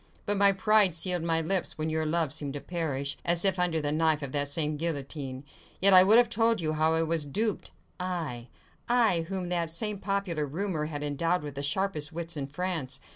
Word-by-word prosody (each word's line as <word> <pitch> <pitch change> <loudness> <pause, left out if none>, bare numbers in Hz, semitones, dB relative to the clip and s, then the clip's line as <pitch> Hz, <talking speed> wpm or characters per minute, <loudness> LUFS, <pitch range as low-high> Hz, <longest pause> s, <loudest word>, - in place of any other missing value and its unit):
But 205 - 0
my 200 0 +6
pride 205 -2 +3
sealed 180 0 0
my 165 0 +1
lips, 180 +3 -2
when 155 0 -2
your 160 0 -1
love 160 -3 0
seemed 145 -2 -4
to - - -3
perish, 140 -3 -3
as 170 +2 +2
if 190 -1 +3
under 175 -3 +1
the 145 -1 -1
knife 155 -1 +1
of 135 - -5
that 145 0 0
same 150 +1 -1
guillotine. 140 -4 -4 0.4
Yet 195 +1 +6
I 185 - +10
would 210 +4 +6
have 240 0 +5
told 225 0 +2
you 155 -2 -1
how 155 +1 +2
I 165 - +2
was 165 -1 0
duped! 210 +9 -2 0.3
Aye! 165 -10 -4 0.4
I, 220 -9 +2
whom 185 -2 -3
that 170 -2 -1
same 205 +5 -3
popular 190 -7 -2
rumour 160 0 -2
had 145 -2 -5
endowed 165 +4 0
with 145 -1 -6
the 140 - -5
sharpest 155 0 -1
wits 170 0 -3
in 140 -2 -4
France! 145 -4 -3
165 Hz, 210 wpm, -28 LUFS, 150-185 Hz, 0.4 s, I